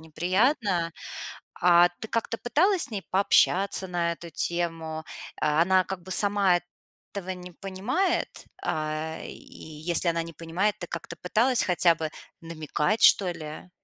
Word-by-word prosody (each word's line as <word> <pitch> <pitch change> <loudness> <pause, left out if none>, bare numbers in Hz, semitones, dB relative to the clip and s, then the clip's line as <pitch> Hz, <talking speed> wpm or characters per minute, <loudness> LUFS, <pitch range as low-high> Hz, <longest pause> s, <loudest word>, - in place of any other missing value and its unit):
неприятно. 180 - 0 0.7
А 175 0 +6
ты 220 - -6
как-то 230 0 -2
пыталась 350 +9 +2
с - - -4
ней 205 -3 -4
пообщаться 195 0 +3
на 175 -2 -1
эту 170 0 -10
тему? 165 -1 -2 0.4
А, 150 +1 +2
она 185 +1 +3
как 190 -1 -6
бы 185 - -12
сама 200 -1 +4
эт 175 - -4 0.5
того 190 -2 -4
не 180 0 -9
понимает? 225 - -1 0.3
А, 155 +1 -3
и - - -8
если 160 +3 -1
она 170 0 +1
не 165 0 -8
понимает, 170 +6 -1
ты 175 - -6
как-то 170 -1 -7
пыталась 235 +7 +2
хотя 175 -1 +3
бы 160 -1 -4 0.3
намекать, 160 +3 -2
что 190 -3 +6
ли? 155 +1 -8
175 Hz, 145 wpm, -26 LUFS, 165-200 Hz, 0.7 s, А